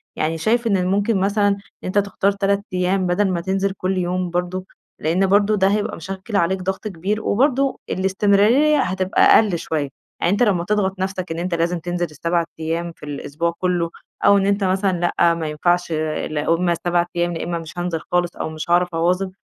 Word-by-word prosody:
يعني 160 +1 -1
شايف 230 +7 +1
إن 185 -3 +1
ممكن 200 +2 +1
مثلًا 200 +1 +2 0.3
أنتَ 185 +3 -2
تختار 200 0 +1
3 200 0 0
أيام 185 +1 +1
بدل 190 +2 +1
ما 170 -1 -1
تنزل 195 +1 0
كل 185 0 -1
يوم 180 0 -1
برضه، 180 +2 -2 0.3
لأن 175 +5 +1
برضه 205 +2 +3
ده 190 -1 +3
هيبقى 205 +1 0
مشكِّل 195 +5 -6
عليك 185 +1 +1
ضغط 190 +3 -3
كبير، 200 +3 -2
وبرضه 270 +3 +1
الاستمرارية 205 +10 +3
هتبقى 185 -2 0
أقل 205 -6 +5
شوية. 155 -3 -2 0.3
يعني 175 - +2
أنتَ 205 - +2
لما 190 -6 +2
تضغط 195 -2 0
نفسك 185 -2 -3
إن 165 - -3
أنتَ 180 +1 -2
لازم 170 +1 0
تنزل 175 +1 -2
ال7 170 +2 -1
أيام 165 +2 -2
في - - -20
الأسبوع 150 +3 -3
كله 175 -2 0 0.4
أو 200 - +7
إن 195 - +1
أنتَ 200 0 +1
مثلًا 190 -1 +1 0.2
لأ، 170 -1 +4
ما 165 -2 -3
ينفعش، 175 +3 0 0.4
لا 150 -1 -2
هم 170 +1 +2
7 175 0 +2
أيام، 175 0 0
لا 165 - -4
إمّا 170 0 -2
مش 165 +1 -10
هانزل 175 -2 -2
خالص، 175 -1 +1
أو - - -4
مش 155 +1 -7
هاعرف 175 +1 +3
أواظِب، 180 +3 +1
185 Hz, 190 wpm, -21 LUFS, 170-200 Hz, 0.4 s, أو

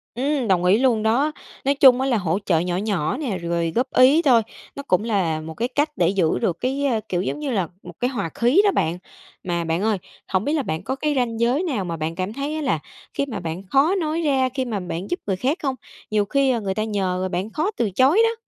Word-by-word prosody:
Ừm, 270 0 0
đồng 180 -3 +2
ý 185 +3 +5
luôn 235 -4 +2
đó. 250 +8 +2 0.3
Nói 280 +1 +3
chung 260 -2 +6
á, 270 - 0
là 245 - +2
hỗ 180 -1 0
trợ 165 -4 +3
nhỏ 175 +1 -1
nhỏ 195 -2 -1
nè, 255 -10 -2
rồi 170 -1 -1
góp 250 +3 +1
ý 270 +6 +6
thôi, 250 -7 +5 0.3
nó 280 - -6
cũng 185 -7 +1
là 185 -8 0
một 160 +1 -7
cái 230 +8 -2
cách 290 +4 0
để 175 -1 +2
giữ 180 -5 +1
được 170 - 0
cái, 270 +3 -1
ơ, 240 -5 +1
kiểu 175 -1 0
giống 200 - -3
như 295 -3 -3
là, 195 -7 0 0.2
một 175 - -10
cái 245 - +1
hòa 205 -10 -3
khí 245 +11 +4
đó 405 - +4
bạn. 170 - 0 0.5
Mà 175 -2 -1
bạn 165 +2 -1
ơi, 215 -1 +1 0.3
hổng 185 0 0
biết 290 - 0
là 305 -3 0
bạn 160 -3 -3
có 265 - -2
cái 300 +2 -1
ranh 230 -3 -1
giới 245 +8 +2
nào 260 - -2
mà 170 -1 -4
bạn 160 +1 -3
cảm 185 +3 -3
thấy 285 +3 -3
á, 315 - -3
là 265 - 0 0.3
khi 280 - -1
mà 255 -6 -5
bạn 170 +2 -5
khó 285 +7 +4
nói 325 -3 -1
ra, 270 -4 +2
khi 260 0 -3
mà 220 -4 -2
bạn 180 +1 -5
giúp 355 - -1
người 195 - +1
khác 265 - 0
không? 270 -3 -1 0.4
Nhiều 210 -1 +2
khi 265 +1 +2
người 195 -3 -2
ta 215 - 0
nhờ 185 -3 -1
bạn 185 +4 -2
khó 315 - -1
từ 230 - +1
chối 270 - +4
đó. 455 0 0
225 Hz, 260 wpm, -22 LUFS, 185-275 Hz, 0.5 s, chung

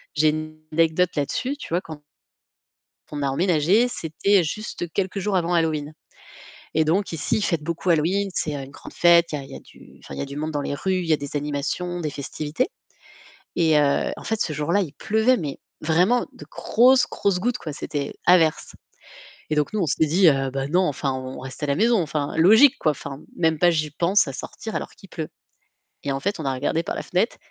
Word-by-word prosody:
j'ai 155 +1 +4
une 155 0 -4
anecdote 165 +2 +2
là-dessus, 255 - -2
tu - - -9
vois, 175 +2 0
quand 155 -2 -10 1.1
on 145 -1 -3
a 140 - +1
emménagé, 180 - +3
c'était 185 +1 +1
juste 175 0 -5
quelques 195 0 -2
jours 195 0 0
avant 175 0 +1
Halloween 155 -3 0 0.8
et 160 0 +3
donc 180 +4 0
ici, 165 +6 -1
ils - - -2
fêtent 170 -6 0
beaucoup 170 +3 -4
Halloween, 180 +5 +2
c'est 155 - -1
une 135 -1 -6
grande - - -12
fête, 170 -1 +5
il 145 -2 -3
y - - -10
a - - -10
du, - - -18
enfin, - - -8
il - - -8
y - - -2
a - - -4
du 140 +1 -8
monde 155 +1 -2
dans 145 -1 -2
les 140 - -3
rues, 190 +5 -1
il 175 - -3
y 160 - +2
a - - +5
des 145 0 -8
animations, 150 +5 -2
des 155 -3 -2
festivités. 150 - -3 0.9
Et 160 -3 +3
heu, 145 -1 +2
en - - -9
fait 220 -1 -2
ce 155 - 0
jour-là, 165 +7 +1
il 155 -5 -4
pleuvait, 220 - +2
mais 150 -6 -5 0.2
vraiment 180 +10 +2
de - - -12
grosses, 250 +1 +4
grosses 195 -3 0
gouttes 245 +4 0
quoi, 155 - -6
c'était 145 -1 -4
averse 165 -3 +3 0.8
et 155 - 0
donc 150 -1 +1
nous, 215 - 0
on 165 - 0
s'est 160 - +2
dit: 175 +3 +4 0.3
«Bah 135 0 -2
non 180 +5 +2
enfin 140 -4 -1
on 130 0 -6
reste 130 +3 -8
à - - 0
la 140 - +1
maison 225 0 +3
enfin 150 -2 -3
logique 220 - +7
quoi, 155 - +2
enfin 140 -1 -7 0.2
même 160 -2 +2
pas 175 -1 +5
j'y 155 -2 -1
pense 170 +3 +2
à 135 - -5
sortir 220 +10 -7
alors - - -4
qu'il 195 - -16
pleut». 160 -2 -5 0.7
Et 140 - -1
en 135 - -3
fait, 200 +2 -2
on - - -4
a 135 - 0
regardé 145 +5 0
par - - -4
la - - -3
fenêtre 185 +6 0
160 Hz, 220 wpm, -23 LUFS, 150-190 Hz, 1.1 s, logique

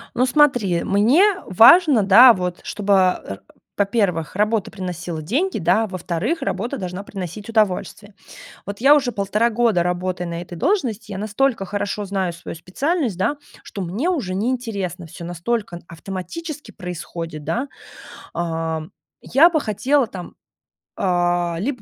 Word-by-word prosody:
Ну 250 +2 +2
смотри, 245 - +3
мне 230 - +4 0.2
важно, 245 - +6
да, 230 +6 +8
вот 180 -3 -4
чтобы, 205 -1 0
а, 180 - +1 0.4
во-первых, 195 -6 0
работа 210 0 0
приносила 175 -5 -5
деньги, 285 - -1
да, 205 +6 +2
во-вторых, 185 - -3
работа 235 +8 -3
должна 180 +1 -5
приносить 195 +2 -7
удовольствие. 205 -1 -1 0.5
Вот 200 +2 -6
я 280 +3 +7
уже 265 -5 +1
полтора 210 +4 0
года 220 -6 +2
работаю 180 0 -2
на 170 0 -4
этой 175 0 -9
должности, 225 - -1
я 190 - -5
настолько 215 +1 0
хорошо 205 +1 -3
знаю 190 -3 -2
свою 170 - -8
специальность, 250 - -2
да, 285 +10 0 0.3
что 200 - -6
мне 205 - -2
уже 250 - -1
неинтересно 200 -6 -3
всё, 170 +2 -10
настолько 175 +1 -3
автоматически 205 - -7
происходит, 170 -4 -7
да. 265 +4 -2 0.7
Ам, 160 -2 -3 0.3
я 300 +7 +5
бы 310 -3 +1
хотела 255 +5 +1
там, 180 -4 -9 0.6
а, 175 -2 0
либо 250 +5 -2
200 Hz, 140 wpm, -21 LUFS, 180-240 Hz, 0.7 s, да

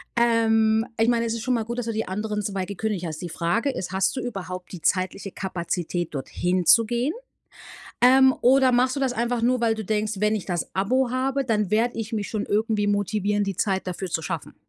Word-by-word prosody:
Ähm, 225 -2 +3
ich 225 - +4
meine, 235 -1 +2
es 225 - -1
ist 225 - -5
schon 255 - 0
mal 230 -2 0
gut, 235 +2 -5
dass 245 - -2
du 230 - -2
die 220 +1 -2
anderen 210 +2 -3
2 195 -2 -3
gekündigt 200 -1 -3
hast. 155 -2 -5
Die 175 - -5
Frage 175 - 0
ist, 190 -8 -5
hast 190 +3 +1
du 260 - -3
überhaupt 185 -6 -6
die 180 - -8
zeitliche 185 +2 -1
Kapazität, 175 -3 -3
dorthin 180 +6 -1
zu 230 +7 +7
gehen? 240 +6 -1 0.9
Ähm, 260 +1 +6
oder 260 +1 +5
machst 255 +2 +2
du - - -2
das 265 -2 +1
einfach 240 0 -1
nur, 250 +1 +2
weil 230 -1 +2
du 220 -1 -5
denkst: 215 +1 -1
„Wenn 210 +2 +1
ich 210 - -4
das 175 -3 -3
Abo 240 +7 +1
habe, 270 +2 0
dann 210 -5 0
werde 230 +3 +1
ich 225 0 -4
mich 210 -2 -3
schon 215 -2 -2
irgendwie 215 0 0
motivieren, 205 0 0
die 195 -2 -3
Zeit 190 -2 -1
dafür 185 +1 -4
zu 160 -1 -2
schaffen.“? - - -5
215 Hz, 220 wpm, -24 LUFS, 190-235 Hz, 0.9 s, zu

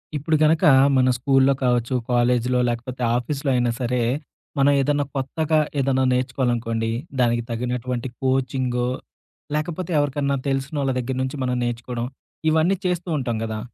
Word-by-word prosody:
ఇప్పుడు 155 +2 0
గనక 160 +3 +3 0.3
మన 130 0 +4
స్కూ‌ల్లో 135 +1 +3
కావచ్చు, 125 0 +1 0.2
కాలేజీ‌లో 125 +1 +2
లేకపోతే 120 +2 -4 0.2
ఆఫీస్‌లో 140 +3 -2
అయినా 120 -1 +2
సరే, 125 0 0 0.6
మనం 140 +1 +5
ఏదన్నా 145 +1 +1
కొత్తగా 155 +4 0 0.2
ఏదన్నా 130 -1 +2
నేర్చుకోవాలనుకోండి, 120 -3 -1 0.3
దానికి 120 -1 +2
తగినటువంటి 125 +1 -3
కోచింగో, 130 -2 0 0.7
లేకపోతే 165 +3 -3
ఎవరికన్నా 140 -1 0
తెలిసినోళ్ళ 135 +1 -1
దగ్గర 125 +1 -3
నుంచి 130 +2 -3
మనం 125 -1 0
నేర్చుకోవడం. 120 0 -3 0.4
ఇవన్నీ 160 +5 +2
చేస్తూ 180 -1 -1
ఉంటాం 120 -4 -2
గదా! 110 -1 -4
130 Hz, 125 wpm, -23 LUFS, 120-140 Hz, 0.7 s, మనం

